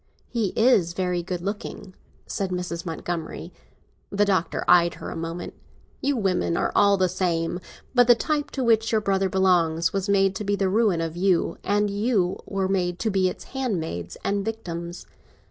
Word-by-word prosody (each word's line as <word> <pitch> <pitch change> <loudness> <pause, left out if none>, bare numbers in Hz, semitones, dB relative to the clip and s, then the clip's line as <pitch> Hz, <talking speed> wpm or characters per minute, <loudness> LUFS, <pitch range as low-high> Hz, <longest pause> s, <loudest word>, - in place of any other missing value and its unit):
"He 230 -4 0
is 215 -8 +4
very 180 -1 -1
good 175 0 -4
looking," 200 0 -5 0.3
said 195 -2 -3
Mrs. 180 -1 -4
Montgomery. 165 0 -5 0.6
The 205 +1 +2
Doctor 190 -4 0
eyed 175 -1 +5
her - - -7
a - - -6
moment. 165 +1 -5 0.5
"You 280 -1 +1
women 185 -5 0
are - - 0
all 200 -1 +5
the 185 -1 +3
same! 175 -2 -1 0.3
But 245 -2 +5
the 240 - +8
type 295 +4 -1
to 265 - -1
which 225 -1 +3
your 220 - +3
brother 195 -1 +1
belongs 170 -3 +2
was 195 0 -1
made 195 -1 +3
to - - -4
be 205 0 +1
the 195 -1 0
ruin 200 -4 +2
of 165 0 -3
you, 180 -1 +1
and 205 0 +1
you 200 -3 0
were 195 -1 -1
made 180 -2 0
to 220 +2 -1
be 190 -1 +2
its - - -8
handmaids 165 - -3
and 200 0 0
victims. 175 -6 -5
190 Hz, 180 wpm, -25 LUFS, 175-205 Hz, 0.6 s, the